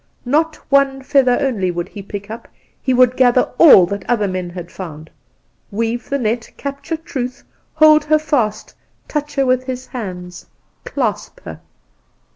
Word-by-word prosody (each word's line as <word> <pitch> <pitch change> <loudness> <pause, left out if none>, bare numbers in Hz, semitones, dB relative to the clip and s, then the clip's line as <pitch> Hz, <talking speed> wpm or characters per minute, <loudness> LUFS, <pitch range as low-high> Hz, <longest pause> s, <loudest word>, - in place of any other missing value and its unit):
Not 310 +5 +1 0.2
one 275 -1 +3
feather 260 -3 +3
only 235 -10 0
would 175 -1 -3
he 205 - -9
pick 200 +1 -8
up; 230 +1 -8 0.3
he 260 - 0
would 255 0 +4
gather 250 -1 +3
all 275 - +9
that 200 +2 -5
other 220 -4 +1
men 185 -1 -4
had 175 -1 -9
found 160 -4 -9 0.6
weave 230 +3 -3
the 280 - 0
net 230 -2 -2
capture 280 +3 -5
Truth 260 -6 -5 0.3
hold 310 -1 +6
her 310 0 +4
fast 250 -9 -1 0.3
touch 295 -1 -4
her 275 -1 +2
with 255 0 +1
his 255 0 -5
hands 180 -7 -7 0.4
clasp - - -3
her! 80 0 -9
245 Hz, 155 wpm, -18 LUFS, 200-275 Hz, 0.6 s, all